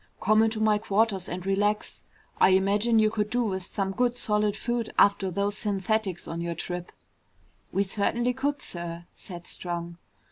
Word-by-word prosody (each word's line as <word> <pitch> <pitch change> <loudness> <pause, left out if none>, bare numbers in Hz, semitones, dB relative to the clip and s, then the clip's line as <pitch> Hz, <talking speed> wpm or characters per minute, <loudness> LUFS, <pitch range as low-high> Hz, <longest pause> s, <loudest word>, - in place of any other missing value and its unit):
"Come 215 +2 +4
into 225 0 +1
my 215 -1 +3
quarters 205 -2 +1
and 180 +1 -5
relax. 205 +2 0 0.4
I - - +6
imagine 205 +4 +2
you 215 -1 +4
could 210 -1 -1
do 245 +2 +1
with 190 -4 -2
some 195 +1 -3
good 245 +4 0
solid 210 -2 0
food 240 -1 -2
after 200 -1 +4
those 200 +3 -1
synthetics 200 -2 -1
on 165 +1 -4
your 170 0 -3
trip." 175 +1 -5 0.8
"We 195 - +2
certainly 235 +5 0
could, 280 +2 -2
sir," 170 -1 -5
said 175 -2 -9
Strong. 170 -1 -5
205 Hz, 165 wpm, -27 LUFS, 185-220 Hz, 0.8 s, I